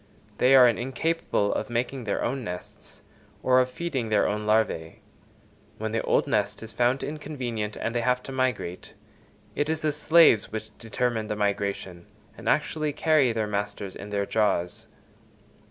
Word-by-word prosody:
They 130 +2 +6
are 125 -2 +9
incapable 125 -1 0
of - - -3
making 120 +1 -2
their 100 - -1
own 130 +2 -2
nests, 90 -3 -9 0.4
or 130 0 +5
of 130 0 +2
feeding 130 -5 -3
their 105 -2 +3
own 105 0 -2
larvæ. 105 -7 +1 0.8
When 110 0 -3
the 115 - 0
old - - +2
nest - - -1
is 110 -2 -9
found 125 +3 +1
inconvenient, 125 -8 -4
and 115 - -3
they 120 - 0
have 125 +1 +1
to - - -8
migrate, 130 -9 -2 0.6
it 145 +1 -1
is 160 0 -1
the 155 - +1
slaves 150 -6 +4
which 110 0 -6
determine 115 -1 -2
the 105 - -2
migration, 100 -3 -2 0.3
and - - -4
actually 155 -2 0
carry 155 -4 +3
their 110 -1 -1
masters 100 -2 -4
in 100 - -8
their 100 -1 -1
jaws. 100 -5 0
115 Hz, 160 wpm, -26 LUFS, 105-130 Hz, 0.8 s, are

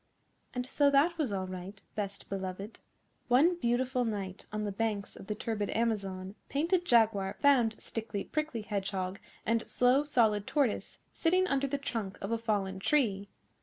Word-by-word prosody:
And 250 0 -1
so 285 +2 +3
that 285 +5 +4
was 280 -8 +1
all 190 -2 -1
right, 185 +2 -7
Best 200 -2 -4
Beloved. 195 +2 -5 0.5
One 290 +9 +5
beautiful 250 -1 +1
night 200 -4 -4
on 215 0 -2
the 205 - -1
banks 210 -1 -2
of - - -11
the 210 - -2
turbid 210 -2 -2
Amazon, 195 -5 -1 0.2
Painted 340 +5 +1
Jaguar 220 - +3
found 245 -6 +4
Stickly 220 -3 -4
Prickly 305 -7 -2
Hedgehog 195 -2 -2 0.3
and 230 0 +2
Slow 250 +3 +4
Solid 220 -8 +2
Tortoise 280 -7 0 0.2
sitting 365 +3 +3
under 275 -4 +1
the 285 +1 -1
trunk 225 -8 -3
of 195 - -4
a 230 - +1
fallen 200 -4 -1
tree. 200 -5 +1
225 Hz, 160 wpm, -31 LUFS, 200-265 Hz, 0.5 s, One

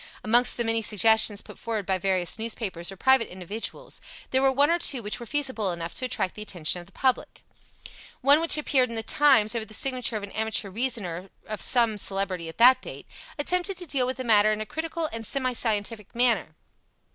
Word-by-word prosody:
Amongst 240 +3 +3
the 240 - 0
many 225 0 +1
suggestions 220 0 +3
put - - -13
forward 220 -4 -4
by 190 0 -1
various 185 0 -1
newspapers 210 -6 -3
or - - -9
private 265 +2 +3
individuals, 205 - -6 0.3
there 260 - +2
were 270 0 +3
one 285 +4 +2
or 340 - +1
two 265 -8 +2
which 210 +4 -3
were 235 - -9
feasible 260 -9 0
enough 170 0 -5
to 255 - -2
attract 190 -6 -2
the 210 - -9
attention 180 -5 -2
of 175 - -16
the - - -19
public. 260 +5 -2 0.8
One 285 +4 +5
which 330 -1 +4
appeared 265 -4 +1
in 230 - -5
The 225 - -3
Times, 260 -5 +4
over 230 -2 -3
the 215 - -7
signature 250 -3 -1
of 205 - -7
an 200 - -8
amateur 220 -2 -2
reasoner 195 -6 -2 0.2
of 215 -1 -6
some 230 -4 +3
celebrity 190 -4 -2
at 165 - -12
that 250 +3 +6
date, - - -10 0.3
attempted 360 +5 0
to 355 - -5
deal 270 -5 0
with 260 - -3
the 260 - -4
matter 215 -3 +4
in 215 - -2
a 215 - -4
critical 320 +4 -4
and 225 0 -5
semi 255 +2 0
scientific 215 -2 -2
manner. 230 -10 +1
225 Hz, 210 wpm, -25 LUFS, 200-260 Hz, 0.8 s, that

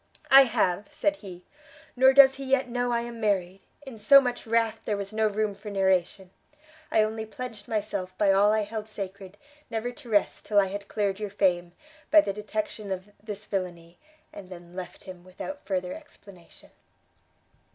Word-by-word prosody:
"I 270 0 +10
have!" 205 -5 0
said 300 0 -1
he; 180 -6 -11 0.5
"nor 260 +1 +6
does 270 0 +8
he 275 0 -8
yet 265 -1 +1
know 245 0 -1
I 235 0 +1
am 235 -1 -7
married: 195 -3 0 0.2
in 250 -5 -10
so 275 +7 +8
much 245 -3 -3
wrath 225 -1 +1
there 210 - -2
was 200 +1 -6
no 220 0 +2
room 210 0 -1
for 205 +2 -10
narration; 190 -1 0 0.6
I 220 - +3
only 220 +1 -3
pledged 220 -1 -8
myself 200 -4 -3
by 200 -2 +3
all 200 +2 +4
I 215 0 +2
held 210 +1 -5
sacred, 200 -2 -8 0.3
never 230 +1 -3
to 245 -1 -14
rest 205 -2 0
till 205 -1 +4
I 200 - +4
had 200 +1 -6
cleared 200 -2 -1
your 210 -1 -4
fame, 180 -3 0 0.4
by 315 - +8
the 200 - -3
detection 210 0 -5
of 190 +2 -5
this 210 -1 -7
villainy, 175 -4 -5 0.3
and 190 -2 -10
then 175 -1 -12
left 185 -1 -8
him 185 -2 -11
without 195 +11 -9
further 185 -2 -2
explanation." 200 - -15
210 Hz, 180 wpm, -27 LUFS, 190-230 Hz, 0.6 s, I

